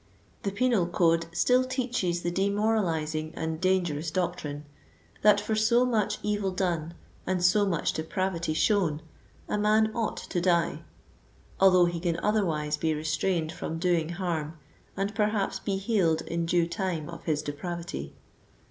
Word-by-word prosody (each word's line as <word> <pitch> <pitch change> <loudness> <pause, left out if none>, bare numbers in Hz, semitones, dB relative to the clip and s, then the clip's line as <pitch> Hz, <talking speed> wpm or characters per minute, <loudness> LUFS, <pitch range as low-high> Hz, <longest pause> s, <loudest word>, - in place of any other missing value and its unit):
The 200 - -2
penal 225 -4 +2
code 165 -1 +2
still 250 +8 +3
teaches 250 -9 -1
the 175 - 0
de 195 +3 +1
moralizing 165 -7 0
and 160 0 -3
dangerous 175 -4 +1
doctrine, 155 -4 -3 0.6
that, 210 -1 +6
for 210 +2 -2
so 235 +3 +4
much 225 -5 0
evil 205 -2 0
done 175 -3 -2 0.3
and 180 -1 +1
so 205 +3 +4
much 170 -5 0
depravity 165 0 -2
shown, 165 -5 +1 0.4
a 210 - -1
man 215 +1 +3
ought 230 -2 -2
to 175 - -3
die; 170 -2 +1 0.8
although 185 -2 +6
he 175 -1 -2
can 170 -1 -1
otherwise 160 -8 +1
be 160 0 0
restrained 160 +2 -1
from 165 -1 -5
doing 170 -2 +1
harm, 170 -3 -3 0.4
and 200 +2 -1
perhaps 210 -1 0
be 195 -2 -2
healed 190 -6 +1
in 170 0 -2
due 170 0 +3
time 170 -3 -3
of 170 - -9
his 155 -3 0
depravity. 160 - -5
175 Hz, 150 wpm, -28 LUFS, 165-205 Hz, 0.8 s, that